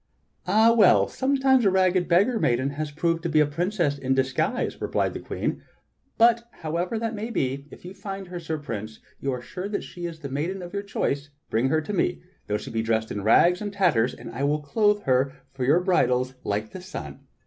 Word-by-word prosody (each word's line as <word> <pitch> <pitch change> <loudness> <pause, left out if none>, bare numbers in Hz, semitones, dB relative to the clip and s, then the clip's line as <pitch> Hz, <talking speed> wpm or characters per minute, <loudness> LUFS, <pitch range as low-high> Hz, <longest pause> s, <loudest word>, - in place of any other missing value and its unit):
"Ah 220 +4 +5
well! 210 -5 +6
sometimes 265 -1 +2
a 200 - +5
rag 185 -1 +3
ged 185 -2 +1
beggar 205 +7 +3
maiden 130 -1 +1
has 150 +1 -4
proved 165 +2 0
to 170 - -2
be 155 0 +3
a 150 - +6
princess 165 -1 -1
in 130 0 0
disguise," 135 - -1
re - - -1
plied - - 0
the - - -5
Queen. - - -3 0.6
"But 235 0 +4
however 170 +7 -2
that 225 0 -2
maj^ 220 +3 -4
be, 140 - -2
if - - -14
you 180 - -7
find 195 -2 -7
her. 175 -1 -5
Sir 160 -1 -3
Prince, 110 -7 -6 0.2
and 140 - -2
are 125 -2 -2
sure 185 +8 -6
that 205 - -2
she 175 -1 -6
is 160 -1 -9
the 140 - -4
maiden 170 +8 -3
of 175 - -9
your 200 - -1
choice, 145 -7 -2 0.2
bring 115 +4 +2
her 155 +2 +2
to 180 +7 -5
me, 70 - 0 0.2
though 105 - 0
she - - -8
be 115 0 0
dressed 110 0 0
in 105 - -3
rags 170 - +4
and 205 -1 -3
tatters, 175 - +2
and - - -9
I 130 +4 -4
will 150 +1 +1
clothe 205 +6 +2
her 130 +1 +2 0.2
for 130 -2 -2
her 150 +7 +5
bridals 130 -9 +2
like 105 +2 -2
the 185 - -8
sun. 185 - -8
165 Hz, 225 wpm, -25 LUFS, 135-195 Hz, 0.6 s, well